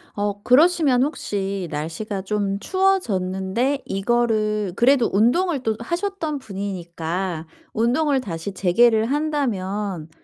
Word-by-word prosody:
어. 205 0 -2
그러시면 285 -2 +4
혹시 200 - -3
날씨가 165 +7 -4
좀 200 -1 -1
추워졌는데 240 - 0
이거를 215 -2 0
그래도 245 +1 +4
운동을 265 - +2
또 220 -2 0
하셨던 340 - -3
분이니까 180 -5 -4 0.3
운동을 260 +5 +2
다시 170 -1 -5
재개를 220 +5 +3
한다면 210 - -2
215 Hz, 260 characters per minute, -22 LUFS, 190-270 Hz, 0.3 s, 그러시면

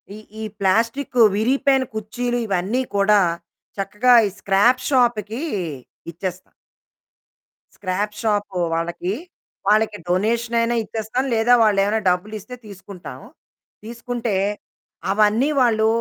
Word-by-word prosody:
ఈ - - -9 0.2
ఈ - - -4 0.2
ప్లాస్టిక్ 230 +7 0 0.2
విరిగిపోయైన 265 +4 +2
కుర్చీలు 240 +3 -3
ఇవన్నీ 200 +6 0
కూడా 200 0 +4 0.6
చక్కగా 210 +5 +2
ఈ - - -3
స్క్రాప్ 205 +6 +3
షాపుకి 240 -3 +1 0.7
ఇచ్చేస్తాం. 185 +2 -6 1.2
స్క్రాప్ 205 +2 -3
షాప్ 205 -3 -1 0.2
వాళ్ళకి, 170 +3 -2 0.5
వాళ్ళకి 215 0 +2
డొనేషన్ 230 +5 0
అయినా 235 +1 0
ఇచ్చేస్తాం. 220 +4 -3
లేదా 230 +2 +3
వాళ్ళేమైనా 205 0 +2
డబ్బులిస్తే 210 +6 -3
తీసుకుంటాం. 195 -2 -10 0.7
తీసుకుంటే, 235 -2 -4 0.8
అవన్నీ 215 +6 +3
వాళ్ళు 220 -3 +3
215 Hz, 95 wpm, -21 LUFS, 200-240 Hz, 1.2 s, కూడా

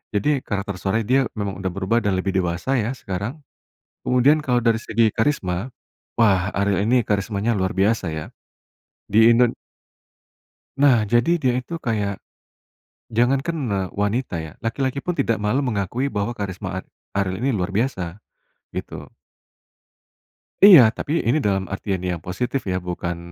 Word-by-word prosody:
Jadi, 140 +5 +1
karakter 100 -1 -3
suaranya 100 +4 -1
dia, 130 +3 +4 0.2
memang 100 -2 -2
udah 95 - -1
berubah 100 +6 0
dan 95 -2 +1
lebih 95 0 -2
dewasa 90 +8 0
ya 115 -1 0
sekarang. 105 - -5 0.7
Kemudian 130 +5 +4
kalo 125 -2 +2
dari 115 -1 +2
segi 115 0 +1
karisma, 110 -2 -1 0.4
wah 100 -4 +2
Ariel 100 0 +1
ini 125 +2 +3
karismanya 105 +1 -1
luar 95 +2 -1
biasa 100 +1 +1
ya. 80 -1 -4 0.8
Di 110 +3 +6
Indon 120 0 +3 1.2
nah 130 -6 +5
jadi 120 +9 +2
dia 130 -7 +1
itu 145 +7 -7
kayak, 105 -4 -1 1.0
jangankan, 135 +8 +1
eee, 95 -2 -1
wanita 105 0 -1
ya, 80 - -8
laki-laki 130 +4 -2
pun 180 - 0
tidak 135 -7 0
malu 105 +7 0
mengakui 120 +2 -1
bahwa 105 0 -2
karisma 100 -5 -5
ar - - -26 0.3
Ariel 100 +3 -1
ini 135 - +2
luar 95 -5 -1
biasa, 100 -7 -1 0.6
gitu. - - -6 1.6
Iya, 185 -9 +11 0.2
tapi 145 - -4 0.2
ini 125 +7 +3
dalam 95 -1 0
artian 95 -2 -3
yang 85 -2 -3
positif 125 +8 -2
ya, 90 - 0
bukan, 85 -1 -4
110 Hz, 145 wpm, -22 LUFS, 95-125 Hz, 1.6 s, Iya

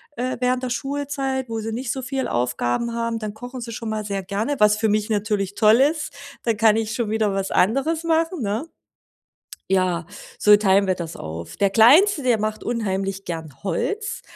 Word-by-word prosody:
äh, 255 +2 -2
während 250 0 0
der 255 - -2
Schulzeit, 270 0 -3
wo 225 -1 -3
sie 220 0 -4
nicht 245 +1 -3
so 265 - -3
viel 265 +1 -2
Aufgaben 125 - -1
haben, 230 -1 -2
dann 215 -2 -5
kochen 245 +3 -8
sie 235 -1 -6
schon 225 0 -5
mal 215 -1 -3
sehr 195 -2 -3
gerne. 210 +9 -2
Was 210 0 +5
für 220 0 +1
mich 210 +1 0
natürlich 205 -2 -1
toll 220 +3 +5
ist, 305 +1 +1 0.3
da 230 - +1
kann 220 0 +4
ich 220 -1 -2
schon 235 -4 -1
wieder 215 -2 +1
was 195 0 -2
anderes 275 - +1
machen, 330 -1 +1
ne? 215 +7 -2 1.0
Ja, 185 -3 +1 0.3
so 210 0 +7
teilen 200 -1 +3
wir 185 - +3
das 170 -2 -6
auf. 80 +1 -7
Der 200 -1 +2
Kleinste, 290 - +6
der 250 -3 +2
macht 215 0 -3
unheimlich 195 -4 -2
gern 160 -3 -7
Holz. 410 - -2
220 Hz, 190 wpm, -22 LUFS, 200-255 Hz, 1.0 s, so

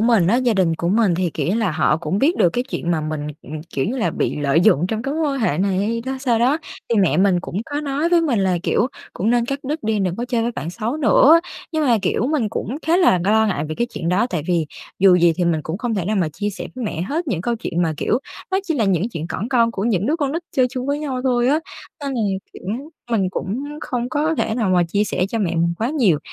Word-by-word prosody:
mình 225 -6 +4
á, 225 +7 +3
gia 245 -3 +2
đình 175 -4 +2
của 170 - -2
mình 205 -2 +3
thì, 175 -1 0
kiểu - - -1
như 195 - +1
là, 220 -5 +1
họ 155 -1 +2
cũng 170 +4 -2
biết 320 +9 +2
được 175 - +4
cái 245 +7 -1
chuyện 175 -10 -3
mà 160 - +1
mình, 155 -1 -3 0.2
ừm, 155 0 -7
kiểu 135 - -1
như 250 +5 -2
là, 175 -9 0
bị - - -1
lợi 145 +2 +2
dụng 180 -4 +4
trong 220 +3 -3
cái 275 +2 -2
mối 320 - -1
quan 275 - -3
hệ 155 -8 +1
này 190 -1 +1
hay 225 +3 0
đó 265 0 -2
sao 240 -4 +2
đó, 260 +7 +3 0.3
thì 230 -3 +3
mẹ 190 - +3
mình 185 -2 +3
cũng 175 - -7
có 290 +1 -1
nói 290 +3 -1
với 345 -1 +4
mình 280 -9 +1
là, 185 -2 +1
kiểu, 215 - +2 0.3
cũng 215 +5 0
nên 240 -1 +3
cắt 275 +1 -2
đứt 300 +4 -3
đi, 220 -1 0
đừng 185 -2 -1
có 240 - -2
chơi 235 -2 +1
với 235 +1 -1
bạn 170 - -5
xấu 235 +8 -3
nữa. 310 +4 +6 0.3
Nhưng 310 -1 +1
mà, 235 -3 +4
kiểu, 205 +5 0
mình 270 -7 0
cũng 225 +4 -4
khá 335 +2 +4
là 345 - +4
lo 220 +2 +4
ngại 155 -7 -1
về 155 - -3
cái 235 - 0
chuyện 165 - -3
đó, 200 +6 +2
tại 170 -5 -2
vì 170 -3 +1 0.3
dù 185 -2 +6
gì 170 -1 +4
thì 180 - +1
mình 165 -2 +1
cũng 165 +5 -4
không 240 -2 -2
thể 190 -5 -1
nào 210 +2 0
mà 170 -5 +1
chia 205 +7 -3
sẻ 200 - -6
với 255 -3 -4
mẹ 170 -5 -3
hết 320 - -2
những 175 -8 -1
câu 235 +5 -1
chuyện 175 -6 -2
mà, 160 -2 0
kiểu, 235 - +1 0.3
nó 380 - +2
chỉ 330 -4 -1
là 230 -6 +1
những 195 +2 +1
chuyện 165 -7 -5
cỏn 200 +6 -4
con 235 -3 +3
của 200 -2 -3
những 210 -3 +1
đứa 310 +4 +1
con 285 -4 -1
nít 335 +2 -2
chơi 255 -1 +5
chung 255 0 -4
với 285 +1 0
nhau 270 -4 -3
thôi 245 -1 +2
á. 300 +3 +3 0.5
Nên 275 -1 -2
là, 235 - -1 0.3
kiểu, - - -12 0.5
mình 195 -5 +2
cũng 225 +9 -3 0.2
không 245 -1 -3
có 310 +3 0
thể 220 - 0
nào 220 -6 0
mà 180 -1 +4
chia 205 +4 +1
sẻ 185 - -1
cho 230 - -2
mẹ 195 -6 0
mình 170 +1 +1
quá 225 - 0
nhiều 215 - +3
220 Hz, 285 wpm, -20 LUFS, 180-255 Hz, 0.5 s, nữa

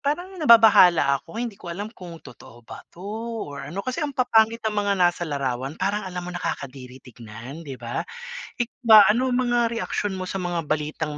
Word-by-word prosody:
parang 350 +7 -3
nababahala 200 - +6
ako, 165 - -13
hindi 230 -3 -4
ko 175 - -9
alam 205 +6 -6
kung 175 -5 -10
totoo 120 -2 -15
ba - - -10
'to 180 - -14 0.4
or 145 -1 -8
ano. 195 +6 -5
Kasi 255 +5 -3
ang 290 -3 -3
papanggit 230 -3 +2
ng 220 - 0
mga 205 -1 0
nasa 175 -1 0
larawan, 135 0 -3
parang 200 +2 -1
alam 180 -3 -6
mo 180 - -6
nakakadiri 130 -7 -6
tignan, 120 +4 -10
'di 140 -5 -8
ba. 120 +1 -4 0.6
Ik 240 - -2 0.2
ba, 220 -2 +10
ano 250 +4 +1
ang - - +1
mga 235 -1 +1
reaksyon 205 -3 -2
mo 185 -1 -5
sa - - -3
mga 175 -2 -2
balitang 150 0 -2
180 Hz, 195 wpm, -24 LUFS, 145-225 Hz, 0.6 s, ba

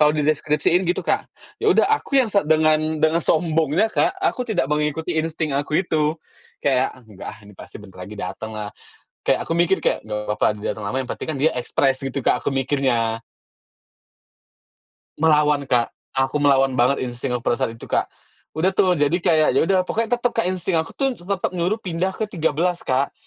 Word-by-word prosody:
kalau 150 0 +6
dideskripsiin 150 +3 +1
gitu, - - -1
Kak. - - 0 0.4
Ya - - +4
udah - - +4
aku 305 -10 +1
yang 255 - +2
se 200 -1 +2
dengan 155 0 +2
dengan 160 +2 +3
sombongnya, 160 +2 +2
Kak, 345 - +2
aku 380 -9 0
tidak 205 -10 +1
mengikuti 150 +3 -1
insting 160 -2 -2
aku 145 +3 +1
itu. 155 0 0 0.4
Kayak, 130 -2 +1
"Ah, - - -18
enggak 105 -3 -10
ah, 110 - -14
ini 105 - -14
pasti - - -11
bentar 95 -3 -11
lagi 105 - -10
datenglah." 105 +3 -5 0.6
Kayak - - +3
aku - - -2
mikir 175 +3 +3
kayak, - - +1
"Nggak 105 -1 -3 0.2
papa - - +2
dia 105 - -3
dateng 105 -2 -7
lama, 130 - -2
yang 125 - -9
penting - - -5
kan - - -5
dia 160 - +4
ekspres," 130 +2 +1
gitu 135 +1 -3
Kak, 125 - +2
aku - - -1
mikirnya. 130 -4 0 2.0
Melawan, 150 -3 +3
Kak. 120 -2 +2 0.2
Aku 135 +2 0
melawan 135 -2 +4
banget 125 +3 +3
insting 125 +1 -4
aku 125 - -2
pada 120 - +2
saat 115 - -1
itu, 115 - -11
Kak. - - 0 0.4
Udah 160 +5 +2
tuh 185 -1 +3
jadi 145 +3 +2
kayak, 160 -3 +3
ya - - +5
udah, 190 0 +3
pokoknya 230 +4 0
tetap 240 0 -1
Kak, 225 - 0
insting 185 -1 -1
aku 160 0 -2
tuh 270 -1 0
tetap 190 +2 -2
nyuruh 180 +4 0
pindah 185 +1 -2
ke 220 - -2
13, 170 0 0
Kak. 130 +2 0
155 Hz, 195 wpm, -22 LUFS, 130-175 Hz, 2.0 s, kalau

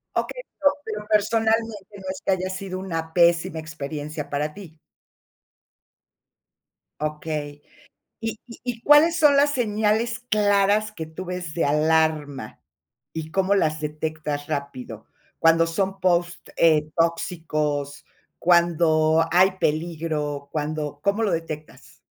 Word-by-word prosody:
Okey, - - -2 0.2
pero 285 -1 +5
pero, 210 -1 -5
personalmente, 220 -1 +1
¿no 190 - -12
es 190 - -8
que - - +2
haya 185 0 0
sido 185 0 -5
una 165 -4 -4
pésima 170 -2 +3
experiencia 150 -1 -6
para 150 +1 -2
ti? 165 -5 -12 2.2
Okey. 150 -1 -4 0.6
¿Y 225 -1 -4
y 235 - -12
y 245 -2 -4
cuáles 310 +3 +6
son 295 -4 +5
las 285 +1 +4
señales 220 -1 0
claras 210 -2 +2
que 165 -6 -6
tú 160 +4 -8
ves 180 -3 -5
de 165 - 0
alarma? 150 -1 +1 0.5
¿Y 160 -1 -5
cómo 195 +2 +2
las 155 -4 +1
detectas 150 -1 -4
rápido 130 -7 -5 0.3
cuando 165 0 +5
son 195 +3 -2
posts, 175 -2 0
eh, 155 -2 +4
tóxicos?, 155 -4 -1 0.3
cuando 165 -2 +3
hay 185 +2 +5
peligro, 155 -3 -2
cuando 150 -1 -3
¿cómo 200 +5 +1
lo 200 - +1
detectas? 160 -2 -6
165 Hz, 120 wpm, -24 LUFS, 155-200 Hz, 2.2 s, cuáles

